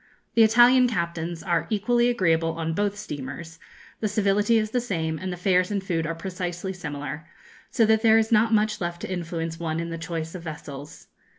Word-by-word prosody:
The 230 - +4
Italian 240 +3 +6
captains 170 -5 -3
are 170 -3 0
equally 240 +3 +2
agreeable 165 -8 +1
on 165 0 -3
both 205 +3 -1
steamers, 150 +1 -7 0.4
the 215 - 0
civility 205 +2 +2
is 215 -1 -1
the 245 - +1
same, 160 -9 -2
and 185 0 -4
the 180 - -5
fares 180 0 +2
and 200 -2 -2
food 165 -4 -1
are 165 - -3
precisely 180 +1 -4
similar, 150 -2 -6 0.4
so 230 - +3
that 220 0 +3
there 220 -1 +6
is 225 0 +1
not 225 +1 +4
much 215 -1 +1
left 175 0 -3
to - - -4
influence 165 -1 -4
one 165 -1 -2
in 170 0 -4
the 165 - -5
choice 165 -1 -4
of 180 - -7
vessels. 150 -3 -9
180 Hz, 195 wpm, -25 LUFS, 165-215 Hz, 0.4 s, Italian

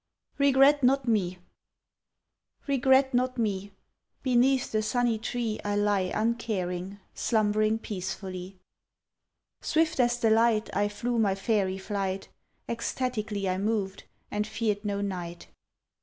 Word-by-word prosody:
"REGRET 280 +1 +5
NOT 260 0 +3
ME" 185 -6 +1 1.3
REGRET 265 -1 +3
not 255 +1 +1
me; 200 -3 -1 0.5
Beneath 255 0 +3
the 215 - +1
sunny 235 0 +1
tree 230 -1 -2
I 205 0 -1
lie 205 -2 +1
uncaring, 200 -5 -2 0.2
slumbering 215 -1 +1
peacefully. 190 -2 -6 1.0
Swift 320 -1 +1
as 240 -1 +3
the 225 -2 +2
light 225 -1 +2
I 205 +1 +2
flew 235 +3 -2
my 200 -3 +2
faery 195 -2 0
flight; 195 -1 -3 0.4
Ecstatically 220 -4 -2
I 185 0 0
moved, 200 -2 -2 0.3
and 210 0 -1
feared 215 -2 -1
no 200 -1 -2
night. 175 -3 -5
215 Hz, 115 wpm, -28 LUFS, 195-245 Hz, 1.3 s, REGRET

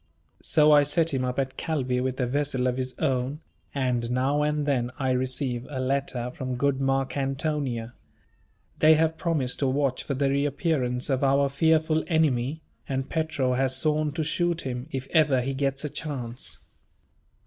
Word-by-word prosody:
So 155 -1 +4
I 145 -1 +7
set 155 +2 +1
him 130 -1 0
up 125 0 -2
at 135 -1 -2
Calvi 130 -6 -1
with 130 +1 -2
a 125 - +2
vessel 135 0 0
of 125 0 0
his 130 -1 -3
own, 135 -1 -1 0.3
and 125 -4 -1
now 130 +4 +1
and 150 0 0
then 125 -4 +1
I 130 -2 0
receive 130 -1 -1
a 135 -3 -4
letter 130 -2 -1
from 130 0 -4
good 140 +1 +1
Marcantonia. 135 -2 -1 0.9
They 155 0 +7
have 160 +1 +2
promised 155 -8 0
to 140 - +1
watch 135 -1 0
for 140 - -3
the 135 +1 +1
reappearance 140 -3 0
of 130 +1 +1
our 140 +1 +3
fearful 160 +2 +2
enemy; 155 -2 +1 0.3
and 135 -1 -2
Petro 155 -5 0
has 130 +1 +1
sworn 150 +1 +1
to 160 +1 -1
shoot 170 +2 0
him, 125 0 -5
if 135 -3 -4
ever 150 -5 +4
he 135 +2 -2
gets 135 +1 -1
a - - -2
chance. 125 -5 -5
135 Hz, 170 wpm, -26 LUFS, 130-150 Hz, 0.9 s, I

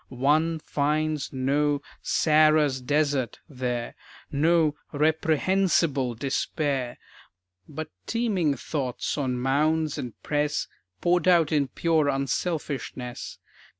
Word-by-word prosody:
One 150 +6 +2
finds 150 0 -1
no 140 +2 +1 0.2
"Sarah's 155 -3 +3
desert" 145 -2 0
there, 125 -5 -3 0.4
No 155 +1 +3 0.2
"reprehensible" 155 -3 +1
despair; 135 0 -2 0.7
But 155 +1 -6 0.2
teeming 200 -11 +1
thoughts 135 -4 -3
on 130 -4 -1
Mounds 150 +4 +1
and 120 -4 -7
Press 150 0 0 0.3
Poured 175 0 +2
out 170 -4 +5
in 145 -3 +2
pure 160 +2 +1
unselfishness. 135 -3 -3
150 Hz, 90 wpm, -26 LUFS, 135-160 Hz, 0.7 s, out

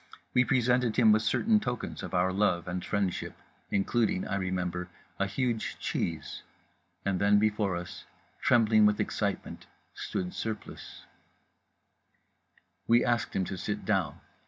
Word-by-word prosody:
We 125 - +5
presented 125 -2 +2
him 115 -3 +6
with 110 +1 +4
certain 215 - +2
tokens 125 - -4
of - - -5
our 90 +1 +2
love 95 -4 +1
and 90 0 -3
friendship, 100 -3 -2 0.3
including—I 100 -1 0
remember—a 90 0 -3
huge 115 +2 -2
cheese… 80 -3 -3 0.6
and 95 -2 0
then, 100 +1 +4
before 105 -3 +1
us, 85 0 -7 0.4
trembling 110 -3 +5
with 105 0 +1
excitement, - - -3 0.3
stood 90 -1 -4
Surplice— 110 -2 -6 1.8
We 120 +1 +4
asked 120 -2 0
him 95 - +1
to 95 - -5
sit 105 +2 -3
down. 95 -8 0
105 Hz, 125 wpm, -29 LUFS, 95-115 Hz, 1.8 s, him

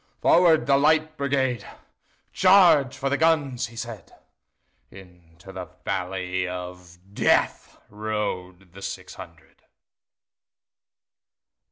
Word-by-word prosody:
"Forward, 170 -2 +4
the 140 0 +3
Light 155 +1 +2
Brigade! 135 -5 -1 0.7
Charge 180 -8 +5
for 135 - -3
the 140 +1 0
guns!" 145 -6 +1
he 115 - -16
said:Into 95 -5 -14
the 95 -1 -7 0.2
valley 90 0 -3
of 90 -1 -8 0.2
DeathRode 100 -5 -2
the 100 - -12
six - - -7
hundred. - - -14
110 Hz, 85 wpm, -24 LUFS, 90-140 Hz, 0.7 s, Charge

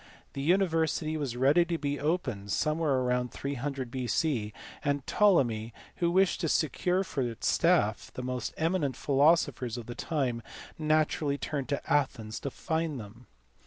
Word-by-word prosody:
The 135 - -4
university 160 -2 +1
was 140 -6 -3
ready 140 +7 +5
to 170 -1 -1
be 145 -1 -2
opened 130 - -1
somewhere 150 - +1
about 125 0 0
300 140 -2 -4
B.C., 125 -3 -1 0.3
and 145 -2 0
Ptolemy, 120 - +2 0.2
who 170 - +2
wished 190 +2 +2
to 165 - 0
secure 180 +5 +1
for 145 -7 -3
its 120 -3 -3
staff - - +2
the 125 - -6
most 125 -1 -3
eminent 160 -5 0
philosophers 140 -4 +2
of 120 - -6
the 120 - -6
time, 130 -6 -2 0.4
naturally 155 -2 +1
turned 145 -2 -3
to 140 - -2
Athens 115 -7 0
to 140 - -3
find 160 0 -2
them. 115 +3 -11
140 Hz, 150 wpm, -29 LUFS, 125-160 Hz, 0.4 s, ready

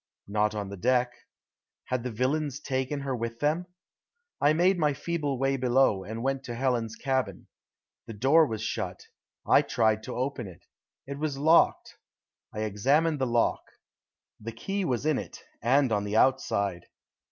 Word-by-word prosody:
Not 105 +1 0
on 100 -2 -4
the 100 - -7
deck. 125 +4 +1 0.7
Had 125 -1 -2
the 125 - -3
villains 135 +4 -1
taken 135 0 -2
her 135 -2 -2
with 115 0 -4
them? 160 +5 0 0.7
I 145 - +5
made 175 +4 +3
my 150 -3 +2
feeble 150 -5 -2
way 135 +1 +1
below 125 -6 +2
and 110 +4 -6
went 135 0 -1
to 120 - -5
Helen's 120 -3 -1
cabin. 130 -8 -2 0.6
The 115 - -7
door 145 +8 +4
was 110 -2 -4
shut. - - -4 0.4
I - - +6
tried 110 -1 +1
to 125 - -6
open 130 -3 -3
it. 90 -3 -14 0.4
It 140 +1 -6
was 150 -3 -2
locked. 160 +4 +3 0.5
I 105 - -5
examined 140 +10 +1
the 130 - 0
lock. 120 -1 +1 0.8
The 115 +1 -7
key 195 - -3
was 130 -2 -1
in 155 -3 +2
it, - - -9 0.2
and 130 +2 +3
on 105 -1 +1
the 105 +1 -1
outside. 100 -8 +1
130 Hz, 165 wpm, -28 LUFS, 110-145 Hz, 0.8 s, I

